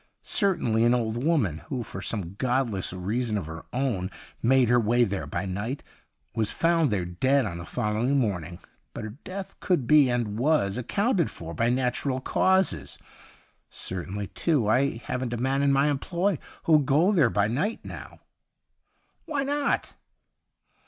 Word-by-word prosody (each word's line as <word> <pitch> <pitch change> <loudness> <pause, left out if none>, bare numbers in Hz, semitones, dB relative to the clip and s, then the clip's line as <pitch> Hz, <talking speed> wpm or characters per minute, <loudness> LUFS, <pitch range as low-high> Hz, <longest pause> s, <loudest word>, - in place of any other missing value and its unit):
Certainly 120 - +2
an 120 +1 +4
old 115 0 -1
woman, 130 - +1
who 125 -3 -2
for 95 - -7
some 95 -4 -3
godless 120 -3 0
reason 105 +5 -1
of 95 - -3
her 80 +1 -8
own 120 -8 -1 0.3
made 130 +1 +4
her 120 +1 +4
way 120 +2 +3
there 100 -4 -2
by 90 +3 -3
night, 100 +9 -4 0.5
was 110 -2 0
found 165 -3 +2
there 95 -5 -1
dead 130 +10 +1
on 85 -4 -4
the 85 - -7
following 120 +5 0
morning; 90 - -1 0.4
but - - -5
her 110 - -5
death 190 +1 -7
could 175 -10 +1
be, 145 0 +6
and 115 -3 -1
was, 130 -8 +2
accounted 195 - +1
for 85 0 -7
by 115 +5 +1
natural 130 +1 0
causes. 185 - +1 0.7
Certainly, 95 +2 -4
too, 145 -10 +1
I 130 +3 +2
haven't 125 -1 -3
a - - -2
man 135 +3 0
in 140 0 +3
my 140 +1 +3
employ 170 +5 0 0.2
who'll 155 -2 +5
go 150 +7 +3
there 160 - +4
by 105 -1 +1
night 150 - -2
now.' - - -9 0.5
' - - -45
Why 290 -3 -1
not 285 +1 -1
125 Hz, 160 wpm, -26 LUFS, 105-145 Hz, 0.7 s, be